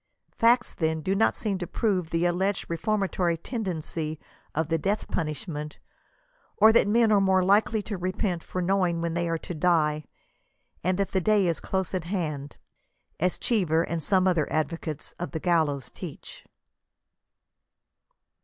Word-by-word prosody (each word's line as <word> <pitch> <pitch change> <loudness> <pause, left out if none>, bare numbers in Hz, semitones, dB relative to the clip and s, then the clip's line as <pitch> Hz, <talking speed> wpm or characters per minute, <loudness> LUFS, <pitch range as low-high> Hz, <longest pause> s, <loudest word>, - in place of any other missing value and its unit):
Facts, 240 +2 +3
then, 160 -1 -1
do 190 +5 0
not 210 +3 +3
seem 200 -4 -2
to 175 - -4
prove 190 -7 0
the 165 +1 0
alleged 190 +3 0
reformatory 180 -1 0
tendency 165 - -4 0.4
of 160 0 0
the 165 0 0
death 200 +6 -1
punishment, 150 -1 -4 0.8
or 220 +2 +7
that 225 - +5
men 225 +1 +4
are 205 -2 +5
more 190 -1 +3
likely 205 +3 +3
to 205 -3 -5
repent 185 -1 -2
for 185 - -3
knowing 180 -2 +1
when 170 -1 -1
they 170 0 -1
are 165 - 0
to 175 - -7
die, 155 -2 +2 0.8
and 185 +2 +1
that 200 -1 -1
the 190 - +1
day 210 +1 +3
is 170 -2 0
close 190 -1 -2
at 180 -3 -2
hand; 155 -6 -3 0.3
— - - -47
as 180 +2 +1
Cheever 170 -8 +1
and 170 -1 -3
some 190 +3 +3
other 170 -5 +1
advocates 155 -1 -2
of 175 - -5
the 160 - -2
gallows 155 -7 +1
teach. - - -9
180 Hz, 160 wpm, -27 LUFS, 160-195 Hz, 0.8 s, or